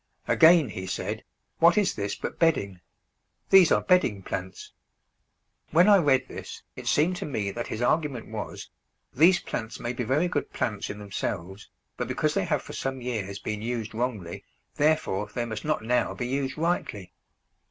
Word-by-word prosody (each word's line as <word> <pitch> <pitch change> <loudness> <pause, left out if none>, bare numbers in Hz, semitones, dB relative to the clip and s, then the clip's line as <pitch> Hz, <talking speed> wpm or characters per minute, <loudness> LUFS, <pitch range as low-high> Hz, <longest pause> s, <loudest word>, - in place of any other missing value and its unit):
Again 160 -5 +6
he 95 -1 -6
said, - - -3 0.4
"What 170 +5 +6
is 205 -2 +3
this 100 -1 -3
but - - -6
bedding? 100 - +1 0.7
These 190 -3 +7
are - - +3
bedding 150 - +2
plants." 95 0 -6 1.0
When 175 +5 +5
I 205 -1 +8
read 135 -5 +2
this - - -9
it - - -8
seemed 175 +5 +2
to - - -4
me 105 -8 -2
that 120 +4 -5
his 110 - -3
argument 140 -4 0
was, 110 -1 -6 0.4
These 170 +7 +5
plants 115 0 -5
may 120 +1 -3
be 125 - -3
very 140 +9 +1
good 150 -5 -2
plants 105 -3 -2
in 100 - -5
themselves, 100 -1 -5 0.3
but - - -2
because 155 -1 0
they 195 -2 0
have 150 -5 0
for - - -9
some 135 0 -3
years 110 -6 -4
been 105 +1 -4
used 115 -1 -3
wrongly, 110 -7 -3 0.3
therefore 145 -10 +1
they 120 - -1
must 110 +1 -6
not 155 -6 0
now 125 +2 +1
be 120 - -3
used 135 +2 -2
rightly! 110 - -2
125 Hz, 175 wpm, -27 LUFS, 105-155 Hz, 1.0 s, I